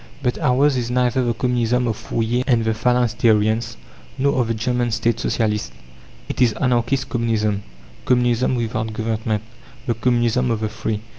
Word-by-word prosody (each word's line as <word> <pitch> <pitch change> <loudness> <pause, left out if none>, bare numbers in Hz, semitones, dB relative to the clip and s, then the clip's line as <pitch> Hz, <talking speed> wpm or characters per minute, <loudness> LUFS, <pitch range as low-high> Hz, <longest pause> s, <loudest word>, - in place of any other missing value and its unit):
But 125 -2 0
ours 135 +2 +3
is 120 -1 -2
neither 125 +1 +1
the 120 -1 0
Communism 125 0 +1
of 110 - -1
Fourier 115 +3 -1
and 120 -4 +2
the 110 - +1
Phalansteriens, 115 -1 +1 0.4
nor 140 -1 +2
of 120 - -1
the 115 - -1
German 120 +2 0
State 115 0 0
Socialists. 105 - -1 0.5
It - - -4
is 120 -3 +4
Anarchist 125 +1 0
Communism, 110 -4 0 0.4
Communism 125 0 +2
without 110 -2 -2
government 110 -1 -2 0.4
the 120 - +1
Communism 120 +1 +1
of 115 -2 -1
the 110 - -1
Free. 110 -1 -3
115 Hz, 155 wpm, -21 LUFS, 110-125 Hz, 0.5 s, is